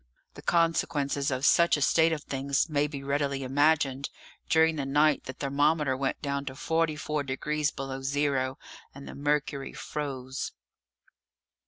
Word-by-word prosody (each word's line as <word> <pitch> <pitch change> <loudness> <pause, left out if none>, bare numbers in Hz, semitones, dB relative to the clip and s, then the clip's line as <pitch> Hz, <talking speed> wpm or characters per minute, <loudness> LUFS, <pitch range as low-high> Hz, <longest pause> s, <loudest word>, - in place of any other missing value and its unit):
The - - -11
consequences 155 -4 +1
of 130 0 -1
such 170 0 +5
a - - -4
state 160 +4 +4
of 155 -2 -2
things 135 +1 0
may 150 -2 +1
be 140 -2 -7
readily 140 -1 -1
imagined; 140 0 +2 0.4
during 160 0 +4
the 145 - -2
night 145 +2 +2
the 130 - -5
thermometer 145 +1 +1
went 135 0 -2
down 140 -1 -1
to 130 -1 -6
44 155 0 -1
degrees 150 +2 -1
below 135 -1 -6
zero, 135 -1 0 0.4
and 140 - -10
the - - -7
mercury 145 -1 -1
froze. 135 -3 -5
140 Hz, 145 wpm, -28 LUFS, 135-150 Hz, 0.4 s, such